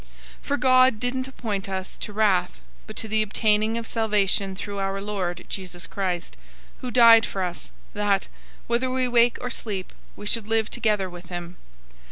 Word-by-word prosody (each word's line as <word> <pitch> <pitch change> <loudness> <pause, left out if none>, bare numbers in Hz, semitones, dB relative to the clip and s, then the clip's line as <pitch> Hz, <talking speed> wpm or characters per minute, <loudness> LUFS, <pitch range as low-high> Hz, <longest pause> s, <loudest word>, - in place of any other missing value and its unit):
005:009 - - -24 0.3
For 285 - -1
God 255 -3 +5
didn't 255 +2 -1
appoint 210 -7 -4
us 190 -1 -4
to - - -5
wrath, 200 - +1 0.3
but - - -9
to 220 - -4
the 220 0 +2
obtaining 215 +1 +1
of 230 - -4
salvation 205 -4 0
through 200 +1 -5
our 195 0 -1
Lord 190 -4 -3
Jesus 180 -3 -4
Christ, 180 - -3 0.4
005:010 - - -26
who 255 - -4
died 230 -2 +7
for 190 - -3
us, 175 -1 -5 0.2
that, 205 -2 +1 0.4
whether 240 +2 0
we 255 0 +1
wake 240 0 +4
or 250 - -3
sleep, 200 -6 -5 0.2
we 205 - -9
should 215 0 -1
live 225 -1 +1
together 210 -3 +1
with 175 -1 -11
him. 175 0 -6
210 Hz, 180 wpm, -25 LUFS, 190-230 Hz, 0.4 s, died